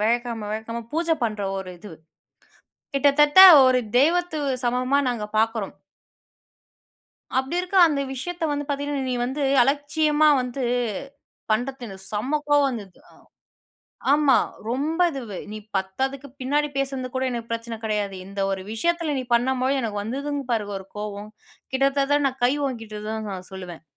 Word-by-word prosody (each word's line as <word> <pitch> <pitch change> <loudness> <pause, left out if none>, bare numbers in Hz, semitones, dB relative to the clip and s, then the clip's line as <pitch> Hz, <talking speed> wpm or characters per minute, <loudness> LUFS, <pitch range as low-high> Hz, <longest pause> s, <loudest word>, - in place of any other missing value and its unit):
வியாழக்கிழக்கம 230 -1 -1
வியாழக்கிழக்கம 225 +2 -5
பூஜ 335 +1 -1 0.2
பண்ற 215 -2 -2 0.2
ஒரு 185 -1 -7
இது. 195 -1 -11 1.0
கிட்டத்தட்ட 290 +4 +5 0.3
ஒரு 255 -1 +4 0.2
தெய்வத்து 340 +2 +2 0.3
சமமா 255 +3 +1
நாங்க 235 -4 -2
பார்க்குறோம். 225 -2 0 1.6
அப்டி 265 +6 -1
இருக்க 365 +2 -3
அந்த 290 -3 -1
விஷயத்த 335 +6 -4
வந்து 290 0 -2
பார்த்தீங்கன்னா, 285 -1 -2
நீ - - 0
வந்து 275 +3 -3 0.2
அலட்சியமா 295 +3 +2
வந்து 250 +1 -4 0.9
பண்றது 250 +4 -1
எனக்கு 190 -2 -10
செம்ம 235 +8 -1
கோவம் 290 -1 +4
வந்தது 205 -7 -8
அ. - - -20 1.0
ஆமா 290 -2 +5 0.3
ரொம்ப 290 +8 -1
இது 275 -4 -5 0.3
நீ 215 - -5 0.2
பத்தாதுக்கு 265 +9 -2
பின்னாடி 295 +3 +1
பேசுனது 270 -2 -2
கூட 260 - 0
எனக்கு 235 -1 -5
பிரச்சனை 230 0 -4
கடையாது 210 -3 -1
இந்த 200 +1 -8
ஒரு 190 - -3
விஷயத்தில 330 +6 0
நீ 260 - -2
பண்ணும் 250 +2 +2
பொழுது. 270 +2 +1
எனக்கு 215 -3 -3
வந்ததுங் 280 +5 -3
பாருங்க 210 -3 -1
ஒரு 190 - -10
கோவம் 210 0 -5 0.4
கிட்டத்தட்ட 275 +2 +2
நான் 265 0 -1
கை 245 - +5
ஓங்கிட்ட 225 -5 -5
தான் 220 -1 -4
நான் 185 -1 -7
சொல்லுவேன். 180 -4 -8
255 Hz, 145 wpm, -24 LUFS, 220-285 Hz, 1.6 s, கிட்டத்தட்ட